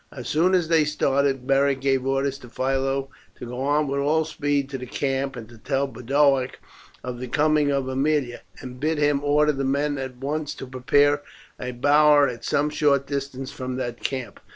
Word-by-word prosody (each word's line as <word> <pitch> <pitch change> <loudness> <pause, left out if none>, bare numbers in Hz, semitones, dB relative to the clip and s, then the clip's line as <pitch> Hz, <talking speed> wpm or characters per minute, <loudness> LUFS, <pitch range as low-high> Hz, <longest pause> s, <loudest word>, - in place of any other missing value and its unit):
As 125 -4 -8
soon 175 +5 +3
as 175 -3 +1
they 165 -1 +4
started, 140 -3 0
Beric 135 0 +2
gave 135 -1 0
orders 135 0 0
to 125 - -13
Philo 135 +2 -1 0.3
to - - -8
go 125 +2 -6
on 145 +2 +1
with 140 +1 -1
all 155 +3 +2
speed 145 -2 -1
to 135 - -4
the 125 - -7
camp, 135 +1 -2
and 115 -3 -8
to 120 -2 -16
tell 135 +4 0
Boduoc 135 +1 +1 0.5
of 125 -1 -5
the 125 - -5
coming 150 +2 +2
of 135 -2 -1
Aemilia, 135 -1 0 0.2
and 125 -1 -9
bid 155 +3 0
him 145 -1 +1
order 150 +1 +3
the 135 -1 -3
men 140 +1 0
at 130 -1 -6
once 150 +3 -3
to - - -7
prepare 145 +3 +2 0.4
a 125 - -4
bower 145 +3 +5
at 120 -2 -6
some 150 +4 0
short 140 -2 +2
distance 135 -1 -4
from 130 -3 -5
their 120 -2 -3
camp. 130 +1 -5
140 Hz, 195 wpm, -24 LUFS, 130-145 Hz, 0.5 s, bower